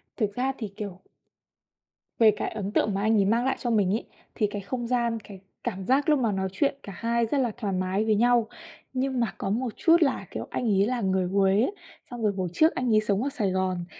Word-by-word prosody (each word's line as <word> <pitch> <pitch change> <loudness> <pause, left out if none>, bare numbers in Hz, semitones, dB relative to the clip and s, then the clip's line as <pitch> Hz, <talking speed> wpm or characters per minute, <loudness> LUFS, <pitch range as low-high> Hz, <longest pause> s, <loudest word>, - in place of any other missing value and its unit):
Thực 205 -4 -1
ra 265 +2 0
thì, 220 - -4
kiểu 200 -3 -6 1.2
về 220 -2 +7
cái - - -3
ấn 205 -2 -4
tượng 210 - +1
mà 195 - -1
anh 220 +2 +3
ấy 200 - +3
mang 230 +5 +2
lại 265 - +1
cho 240 - -2
mình 205 -4 +2
ấy, 225 - -2 0.3
thì 215 - +1
cái 205 0 -5
không 240 +4 -4
gian, 235 -2 0
cái 195 -2 -11 0.2
cảm 185 0 -4
giác 275 +5 +2
lúc 300 -2 +4
mà 230 -4 +1
nói 190 -1 -1
chuyện 275 +9 0
cả 200 - -8
hai 235 +2 0
rất 275 +6 -1
là 245 -4 +1
thoải 205 -5 -2
mái 185 +3 0
với 215 -1 +3
nhau. 240 0 +3 0.5
Nhưng 260 0 -1
mà 235 -3 0
có - - -3
một 230 +2 -1
chút 340 -2 +4
là, 275 -4 +1
kiểu, - - -5
anh - - -3
ấy 200 -2 +3
là 245 +1 -1
người 190 -1 +1
Huế 195 +1 +2
ấy, 375 - 0 0.4
xong 240 -1 -6
rồi 210 - +3
hồi 185 - -1
trước 315 - +3
anh 250 -2 0
ấy 215 - +5
sống 210 +2 0
ở 280 - 0
Sài 215 -9 -1
Gòn, 185 -2 -1
220 Hz, 250 wpm, -26 LUFS, 195-250 Hz, 1.2 s, về